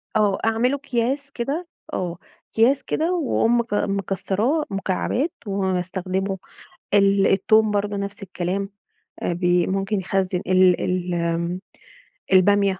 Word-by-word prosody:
آه. 210 -3 +3
أعمله 230 +4 +2
أكياس 275 0 -2
كده 280 +8 -3 0.3
آه. 175 -2 -2 0.4
أكياس 260 +5 +3
كده 330 +3 0
وأقوم 240 -8 +2
مك 230 -3 -3
مكسّراه 200 - 0
مكعبات 195 - -1
واستخدمه. 190 0 -1 0.6
ال 200 -1 +4
التوم 215 +2 +4
برضه 205 0 -1
نفس 200 +1 -5
الكلام. 190 +1 -3 0.5
أ - - 0
بي 175 0 +2
ممكن 195 +2 -1
يخزّن 190 -1 -1
ال 185 -1 +4
ال 180 -1 -1
آمم 170 +1 -1 0.7
البامية، 195 0 +4
195 Hz, 115 wpm, -23 LUFS, 185-225 Hz, 0.7 s, ال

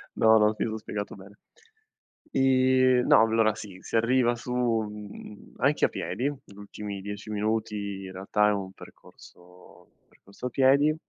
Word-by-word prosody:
No, 110 0 +5
no, 105 0 +3
mi - - +1
son 110 0 -4
spiegato 105 -1 -6
bene. 100 +1 -15 0.9
Ehm, 130 -1 +3
no, - - +7
allora 110 -1 +2
sì, 100 -4 -10
si - - -6
arriva 120 +1 +2
su, 125 +1 -6
mhmm, 105 -4 -4
anche - - +2
a - - 0
piedi. 125 +4 -3
L 130 -8 -12
ultimi 100 -1 -7
10 105 +2 -7
minuti 105 -2 -2
in 95 - -8
realtà 105 +3 +1
è - - +2
un 95 -2 -4
percorso 90 -2 -17 0.2
percorso 100 +5 -13
a - - -4
piedi 140 +4 +3
105 Hz, 155 wpm, -27 LUFS, 100-125 Hz, 0.9 s, no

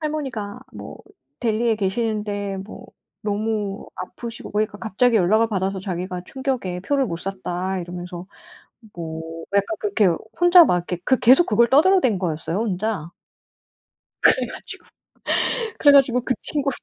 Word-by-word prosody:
할머니가 260 -8 -4
뭐 - - -9 0.4
델리에 230 0 +1
계시는데 205 -1 -2
뭐 195 +3 -10 0.4
너무 210 -1 -2
아프시고 230 +5 -7
그러니까 210 0 -1
갑자기 225 +3 +1
연락을 215 +4 +3
받아서 190 -2 -2
자기가 180 -1 -4
"충격에 255 -10 -3
표를 275 +6 0
못 170 - -4
샀다." 190 0 -3
이러면서 175 +1 -7 0.7
뭐 160 -2 -6 0.3
약간 200 +12 +1
그렇게 400 - +2 0.3
혼자 350 -1 +8
막 180 - +2
이렇게 175 0 -4
그 260 - +3
계속 260 +8 +6
그걸 235 +2 +3
떠들어댄 295 - +4
거였어요 165 -1 -2
혼자. 205 -5 -2 1.1
그래 - - +4
가지고 - - -9 0.9
그래 285 - +7
가지고 260 -3 +5
그 255 - -1
친구 285 -2 -1
210 Hz, 310 characters per minute, -22 LUFS, 185-250 Hz, 1.1 s, 혼자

